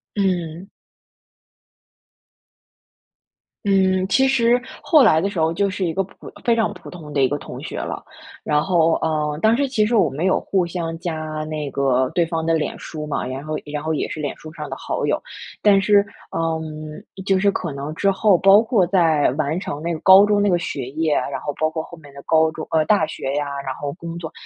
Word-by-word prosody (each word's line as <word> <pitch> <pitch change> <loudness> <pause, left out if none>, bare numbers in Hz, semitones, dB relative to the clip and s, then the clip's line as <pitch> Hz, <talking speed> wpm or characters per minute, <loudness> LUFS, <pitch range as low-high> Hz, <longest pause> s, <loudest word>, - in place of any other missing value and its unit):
嗯。 180 -2 -2 3.0
嗯， 190 -1 +2
其 265 +7 +3
实 245 -2 +3 0.2
后 305 -4 +5
来 160 - +5
的 195 +5 0
时 195 - -4
候 160 0 +2
就 200 +3 +1
是 190 0 -3
一 170 -3 -1
个 195 - 0
普 195 - -13
非 235 - +4
常 225 -1 0
普 - - -12
通 160 -5 -10
的 140 - 0
一 130 - +5
个 145 - -2
同 - - -9
学 - - -6
了， - - -5 0.4
然 150 0 +2
后， 165 -3 +3
呃， 150 -2 -1
但 220 +2 +4
是 280 +1 +1
其 230 -5 +1
实 230 +3 0
我 185 -8 +4
们 140 +5 -4
有 190 - +3
互 190 -3 0
相 165 -1 -4
加 175 -1 -3 0.3
那 155 -2 -4
个 130 -2 +1
对 175 - +3
方 165 -1 -3
的 165 - +2
脸 160 -2 -1
书 155 -2 -7
嘛， 150 - -2
然 130 +2 -5
后 155 0 -4
然 150 0 -5
后 160 +1 -1
也 150 - -1
是 155 - -5
脸 145 -2 -2
书 155 0 -11
上 - - -7
的 - - -4
好 - - -3
友。 - - 0 0.4
但 200 -2 +5
是， 205 0 +4 0.3
嗯， 160 +1 -4 0.2
就 195 -1 +3
是 200 +1 +3
可 170 -6 -4
能 140 +2 -5
之 195 - +2
后， 195 -1 +3
包 195 +3 +6
括 225 -5 +2
在 165 -5 +3
完 155 +4 -1
成 150 -6 -5
那 170 +2 -2
个 160 - -5
高 190 +3 +8
中 205 -1 +2
那 205 - +2
个 175 - +3
学 125 - -4
业， 155 +1 0
然 - - -2
后 - - -3
包 155 - +2
括 160 0 -4
后 170 - -12
面 145 -3 -15
的 140 - -10
高 160 0 +3
中 155 0 -7
呃， 155 -1 +2
大 205 -4 +3
学 135 -3 -4
呀， 145 0 0 0.2
然 135 - -3
后 145 -1 -4
工 170 -1 -7
作， 160 -2 -7
165 Hz, 235 characters per minute, -21 LUFS, 155-195 Hz, 3.0 s, 高